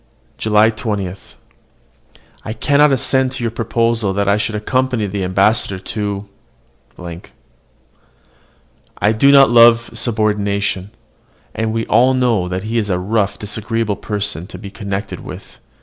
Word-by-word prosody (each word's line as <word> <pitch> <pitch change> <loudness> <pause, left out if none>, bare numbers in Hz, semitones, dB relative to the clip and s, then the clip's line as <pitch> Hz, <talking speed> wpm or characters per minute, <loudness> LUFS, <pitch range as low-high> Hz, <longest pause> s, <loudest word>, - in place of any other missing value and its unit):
JULY 110 +1 +3
20. 105 -4 -3 1.3
I 110 - -5
cannot 145 +4 +3
assent 130 0 +1
to 130 -2 -5
your 115 - -1
proposal 115 -2 0
that 100 0 -1
I 100 - +4
should 105 +1 -2
accompany 125 +1 0
the 100 0 -3
ambassador 95 +2 +2
to. 100 +1 -4 2.7
I 105 - +2
do 125 +6 +4
not 135 -3 +6
love 115 0 +6
subordination; 100 -4 -1 0.6
and 110 0 -2
we 115 0 -2
all 125 +4 +3
know 120 -8 +1
that 95 +1 -4
he 115 +2 -1
is 105 -2 -3
a 90 - +1
rough, 100 +1 -1
disagreeable 110 +1 -2
person 100 -6 -3
to - - -10
be 100 - -9
connected 100 -1 -5
with. - - -11
110 Hz, 135 wpm, -17 LUFS, 100-115 Hz, 2.7 s, not